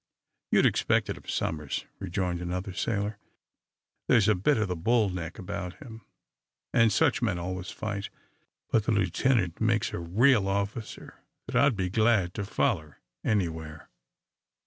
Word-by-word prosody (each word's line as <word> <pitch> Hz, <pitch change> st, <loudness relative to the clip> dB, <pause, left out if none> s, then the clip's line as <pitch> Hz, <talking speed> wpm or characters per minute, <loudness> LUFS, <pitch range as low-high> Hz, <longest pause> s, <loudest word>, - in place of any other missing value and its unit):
"You'd -, -, +5 dB
expect -, -, +2 dB
it -, -, -5 dB
of -, -, -13 dB
Somers," 75 Hz, -3 st, -2 dB
rejoined 90 Hz, -2 st, -2 dB
another 90 Hz, +2 st, -3 dB
sailor. 105 Hz, +1 st, -2 dB, 0.9 s
"There's 115 Hz, -4 st, +5 dB
a 105 Hz, -, +5 dB
bit 105 Hz, +9 st, +2 dB
of 110 Hz, -2 st, +1 dB
the 90 Hz, -, -2 dB
bull 110 Hz, +5 st, +2 dB
neck 85 Hz, -3 st, -5 dB
about 90 Hz, -3 st, -5 dB
him, 115 Hz, +2 st, -11 dB, 0.7 s
and 115 Hz, -1 st, +5 dB
such 145 Hz, -1 st, +2 dB
men 105 Hz, -7 st, +1 dB
always 90 Hz, +1 st, -4 dB
fight. 100 Hz, -2 st, -4 dB, 0.6 s
But 110 Hz, -2 st, +2 dB
the 115 Hz, -, +2 dB
lieutenant 100 Hz, -1 st, +1 dB
makes 110 Hz, -1 st, +1 dB
a -, -, -3 dB
real 105 Hz, +5 st, +3 dB
officer 100 Hz, +3 st, -4 dB, 0.2 s
that -, -, -6 dB
I'd 140 Hz, -4 st, +4 dB
be 95 Hz, -2 st, -1 dB
glad 110 Hz, -4 st, +3 dB
to 105 Hz, -, -3 dB
foller 90 Hz, -, -1 dB, 0.3 s
anywhere." 80 Hz, -7 st, -2 dB
100 Hz, 145 wpm, -28 LUFS, 90-110 Hz, 0.9 s, You'd